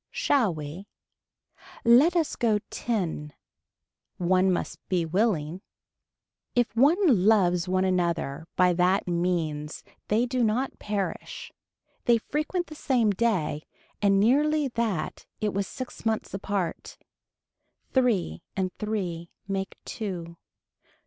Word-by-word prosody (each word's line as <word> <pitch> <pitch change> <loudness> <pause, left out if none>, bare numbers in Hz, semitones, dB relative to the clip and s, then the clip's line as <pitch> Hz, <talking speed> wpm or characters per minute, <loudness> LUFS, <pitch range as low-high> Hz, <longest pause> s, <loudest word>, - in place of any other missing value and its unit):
Shall 250 -9 +2
we. 155 +5 -7 1.0
Let 260 +10 +6
us 330 -3 +1
go 225 -4 +2
ten. 170 -10 -2 0.8
One 185 +1 +3
must 180 - -2
be 180 -3 +1
willing. 180 -2 0 0.9
If 245 -2 +1
one 280 +9 +5 0.3
loves 180 -5 +4
one 185 0 +2
another 170 -4 -1
by 180 -1 +4
that 180 +3 +2
means 170 -4 -1 0.2
they 225 +4 +2
do 250 0 0
not 235 +5 0
perish. 205 -2 -4 0.5
They 235 -1 +5
frequent 305 +9 -2
the 310 - -10
same 250 -7 +2
day 190 -8 0 0.4
and 195 -1 +4
nearly 290 +6 +3
that 225 -9 -2
it 210 -2 -1
was 195 0 -1
six 255 -2 -7
months 220 -1 -1
apart. 195 -3 -3 1.0
Three 225 - +1 0.2
and 185 -1 -1
three 180 -6 -3 0.2
make 195 -1 -3
two. 175 -7 -5
195 Hz, 115 wpm, -27 LUFS, 175-235 Hz, 1.0 s, Let